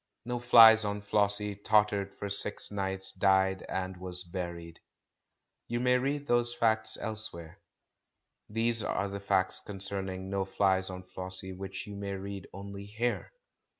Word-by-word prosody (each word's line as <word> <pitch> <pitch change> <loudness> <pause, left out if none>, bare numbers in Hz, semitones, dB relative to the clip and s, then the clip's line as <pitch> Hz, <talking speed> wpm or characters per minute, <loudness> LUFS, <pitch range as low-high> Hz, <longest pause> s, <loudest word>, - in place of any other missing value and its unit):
No 120 0 -3
Flies 115 -2 +8
on 105 0 -3
Flossie 105 0 +2
tottered 100 -1 +1
for 100 - -5
six 100 +1 +4
nights, 95 -1 -2
died, 95 0 +2
and 95 0 -4
was 90 0 -2
buried. 85 -2 -7 0.9
You 120 0 -2
may 125 +1 +3
read 140 +2 -2
those 120 0 +1
facts 110 -1 +1
elsewhere. 105 -7 -5 0.9
These 115 +1 0
are 100 -1 -2
facts 95 -1 0
concerning 95 -1 0
No 100 0 -1
Flies 95 -1 +1
on 90 0 -7
Flossie 95 0 -7
which 95 +1 -7
you 105 - -9
may 100 0 -5
read 100 0 -7
only 100 +1 -8
here. 115 +4 -3
100 Hz, 140 wpm, -30 LUFS, 95-110 Hz, 0.9 s, Flies